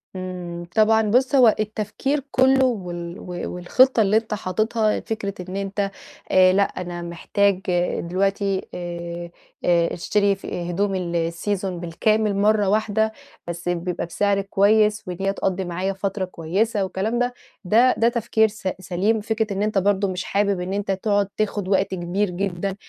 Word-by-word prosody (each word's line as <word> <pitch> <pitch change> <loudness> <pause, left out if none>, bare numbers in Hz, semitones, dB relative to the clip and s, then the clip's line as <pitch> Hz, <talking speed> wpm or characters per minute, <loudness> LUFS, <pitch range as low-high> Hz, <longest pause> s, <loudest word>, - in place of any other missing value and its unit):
إمم، 180 -2 -6
طبعًا 220 0 +5
بُصّ 260 +4 +3
هو 245 -5 +6
التفكير 215 +7 -1
كلّه، 265 0 +4
وال 175 -6 -3
و - - -10 0.3
والخطّة 245 +8 +4
اللي 210 +1 +3
أنت 225 -1 -2
حاطتها 215 +2 0
فكرة 205 -3 -4 0.2
إن 190 - -5
أنت 200 0 -2 0.4
آآ، 185 0 +6
لأ 200 - +4
أنا 175 -2 -5
محتاج 185 +3 0 0.4
دلوقتي 195 +2 -1
آآ 170 -1 -6 0.4
آآ، 170 -1 +3
اشتري 200 +2 +1
في 175 -2 -5
هدوم 195 +2 0
السيزون 175 +2 -2
بالكامل 210 +5 +1
مرّة 205 0 +3
واحدة 220 +1 +1 0.4
بس 170 +1 -4
بيبقى 175 0 -2
بسعر 200 +3 +1
كويّس، 210 +2 +3
وإن 180 -1 -5
هي 195 0 +1
تقضّي 190 -1 -1
معايا 185 +3 -2
فترة 195 0 -2
كويّسة 195 +5 -1
والكلام 195 +5 -2
ده، 245 0 0 0.3
ده 235 +7 +5
ده 230 +1 +4
تفكير 230 -2 +2
س 215 -2 -7
سليم، 195 +4 0
فكرة 220 -1 -1
إن 195 +1 -1
أنت 215 -1 0
برضه 200 +1 +2
مش 185 -1 -3
حابب 200 -2 0
إن 180 +2 -3
أنت 200 0 -1
تقعُد 200 +1 +1
تاخُد 205 -2 -1
وقت 195 0 +2
كبير 185 +3 -1
جدًا 190 +1 -3
195 Hz, 155 wpm, -23 LUFS, 180-215 Hz, 0.4 s, هو